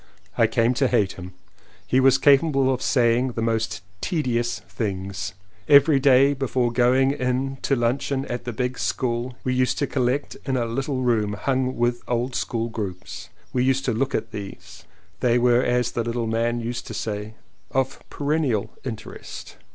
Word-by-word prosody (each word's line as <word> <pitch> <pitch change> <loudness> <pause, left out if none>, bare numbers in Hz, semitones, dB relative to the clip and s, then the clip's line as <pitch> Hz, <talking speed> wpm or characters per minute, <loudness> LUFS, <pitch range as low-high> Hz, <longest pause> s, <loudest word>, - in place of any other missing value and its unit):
I 115 - +4
came 115 +2 +2
to 135 - +5
hate 105 -6 +2
him. 90 -1 -10 0.5
He 130 - +2
was 135 0 +5
capable 135 -2 +4
of 130 - -4
saying 125 0 +2
the 115 - -3
most 110 -3 -1 0.2
tedious 120 -7 -1
things. 95 -4 -4 0.3
Every 145 0 +6
day 135 +1 +5
before 130 -3 0
going 130 +3 +3
in 135 0 -1
to 135 - +1
luncheon 135 +3 0
at 120 0 -4
the 120 - -3
big 125 +2 -3
school 120 0 -1
we 130 - 0
used 125 0 +1
to 145 - +1
collect 130 +1 -1
in 130 -2 -1
a 120 - 0
little 130 +3 -2
room 110 -4 +1
hung 130 +3 -1
with 120 0 0
old 120 +1 -1
school 115 -1 -2
groups. 100 -6 -6 0.2
We 125 - +2
used 135 +1 +1
to 125 - +1
look 135 +5 -1
at - - -3
these: 90 -3 -9 0.3
they 120 -1 +3
were 120 0 +4
as 125 -1 +1
the 115 - -1
little 120 0 -2
man 115 +1 0
used 120 +1 -4
to - - -6
say 105 0 -4 0.3
"of 135 0 -1
perennial 145 -7 -1
interest." 115 -5 -8
125 Hz, 170 wpm, -24 LUFS, 115-130 Hz, 0.5 s, Every